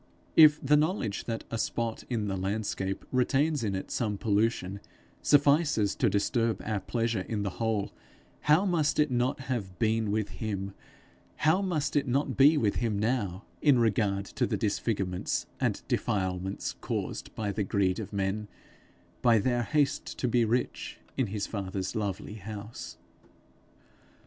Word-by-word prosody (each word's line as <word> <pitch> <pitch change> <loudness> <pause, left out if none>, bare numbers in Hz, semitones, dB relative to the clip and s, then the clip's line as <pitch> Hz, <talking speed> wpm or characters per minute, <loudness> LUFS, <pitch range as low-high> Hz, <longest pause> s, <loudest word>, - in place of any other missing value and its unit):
If 155 -2 +8
the 150 +2 +5
knowledge 150 - 0
that 115 -1 -3
a 115 - -2
spot 115 -1 -2
in 115 -4 -1
the 95 - -1
landscape 95 0 -2
retains 135 +3 +2
in 100 -3 -1
it 95 - -5
some 105 -4 -1
pollution, 100 -2 0 0.4
suffices 145 -7 +4
to - - +3
disturb 115 +1 +1
our 110 -2 -1
pleasure 115 0 -1
in 105 +2 -3
the 100 - -2
whole, 110 -3 0 0.5
how 155 +6 +4
must 165 -6 +1
it 150 -2 +3
not 125 +3 0
have 110 -9 -4
been 110 0 +1
with 105 0 0
him, 100 -3 -4 0.6
how 160 +6 +3
must 155 -6 -1
it 145 -1 +2
not 135 +4 0
be 145 +3 +6
with 105 -8 +1
him 115 -4 0
now, 105 -3 -1 0.2
in 145 -4 +5
regard 105 -4 +1
to - - -1
the - - -1
disfigurements 100 -3 -1
and - - 0
defilements 95 -1 -1
caused - - -4
by 105 -2 -2
the 105 - -2
greed 95 -1 +1
of 105 -2 -6
men, 100 +1 -1 0.7
by 115 -2 +5
their 120 +3 +1
haste 145 +3 0
to 125 - 0
be 120 0 +3
rich, 120 +3 -2 0.2
in 130 -4 +1
his 100 0 -3
father's 95 -1 -4
lovely 105 0 -3
house! 105 +2 -7
110 Hz, 155 wpm, -29 LUFS, 100-130 Hz, 0.7 s, If